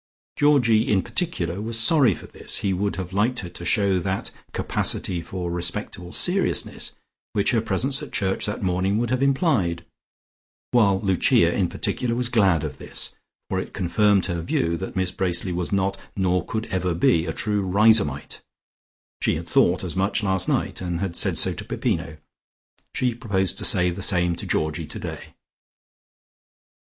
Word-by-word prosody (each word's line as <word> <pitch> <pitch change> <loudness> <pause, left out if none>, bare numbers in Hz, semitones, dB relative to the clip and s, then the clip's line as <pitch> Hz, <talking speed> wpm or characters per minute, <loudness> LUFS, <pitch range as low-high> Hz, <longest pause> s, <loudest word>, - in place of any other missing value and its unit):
Georgie, 125 -7 +3
in 95 -3 +3
particular, 100 - -1
was 115 +1 0
sorry 130 - +5
for - - -11
this; - - -5
he 100 -2 +1
would 100 +2 -1
have 95 -1 -6
liked 110 +6 +1
her 90 - -7
to 85 - -10
show 95 +2 +2
that 95 +2 -3 0.2
capacity 85 -2 0
for 90 +1 -5
respectable 90 +1 -3
seriousness 185 +2 -1 0.4
which 100 - +2
her 115 -3 +2
presence 130 +7 -1
at 150 - -8
church 95 0 -1
that 105 0 -4
morning 95 +2 +1
would 120 +1 -1
have 130 0 0
implied; 135 - +1 0.9
while 100 -5 +4
Lucia, 95 -4 +3
in - - +1
particular, 120 -2 -1
was 120 0 0
glad 95 -10 +3
of 70 -4 -5
this, - - -3 0.4
for - - -1
it - - -7
confirmed 100 +2 +2
her 85 -2 -2
view 85 0 0
that 95 +3 -6
Miss 95 -1 0
Bracely 90 -1 -1
was 85 0 -2
not, 100 0 0 0.2
nor 90 -2 +1
could 110 +3 -3
ever 90 -2 0
be, 85 -1 +3
a - - -1
true 105 +4 -1
Riseholmite. 100 -6 +2 0.8
She - - +2
had - - -6
thought 90 +2 +3
as 90 -1 -5
much 100 +3 0
last 95 -2 +1
night, - - -1
and 90 -2 -2
had 95 -3 -3
said - - +2
so - - +2
to - - -7
Peppino. 75 - -2 0.8
She 125 -2 +1
proposed 100 -6 -1
to - - -2
say 90 -1 +3
the 90 - -6
same 90 -3 +2
to - - -6
Georgie 80 +1 -1
today. 75 - -8
95 Hz, 170 wpm, -24 LUFS, 90-110 Hz, 0.9 s, sorry